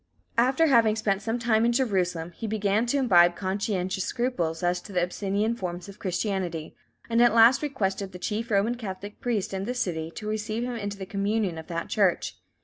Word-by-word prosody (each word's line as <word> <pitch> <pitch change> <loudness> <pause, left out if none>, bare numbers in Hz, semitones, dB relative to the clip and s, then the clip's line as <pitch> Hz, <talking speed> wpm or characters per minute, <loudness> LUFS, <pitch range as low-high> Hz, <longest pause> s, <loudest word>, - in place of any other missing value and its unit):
After 260 +7 +4
having 230 -7 +4
spent 200 -3 0
some 225 +3 -1
time 230 -2 +2
in 235 - +3
Jerusalem, 185 -9 0
he 225 +6 -6
began 210 +1 +1
to 280 - +1
imbibe 175 -9 +5
conscientious 190 -1 -2
scruples 180 -11 -2
as 175 0 +1
to 205 - -11
the 180 - +1
Abyssinian 200 +5 -1
forms 180 -4 -5
of 200 0 -12
Christianity, 180 -4 -2 0.3
and 230 0 +2
at 240 -2 +5
last 235 +2 +7
requested 200 -9 -2
the 180 - -8
chief 215 +5 -3
Roman 210 +3 +2
Catholic 205 -3 -7
priest 220 -6 -1
in 190 0 -2
the 250 +3 -3
city 165 -9 -2
to 210 - -6
receive 215 +2 -2
him 245 0 -3
into 205 -3 -4
the 190 - -6
communion 200 -2 -1
of 160 - -10
that 170 -1 -3
Church. 195 -5 +1
205 Hz, 195 wpm, -26 LUFS, 185-230 Hz, 0.3 s, last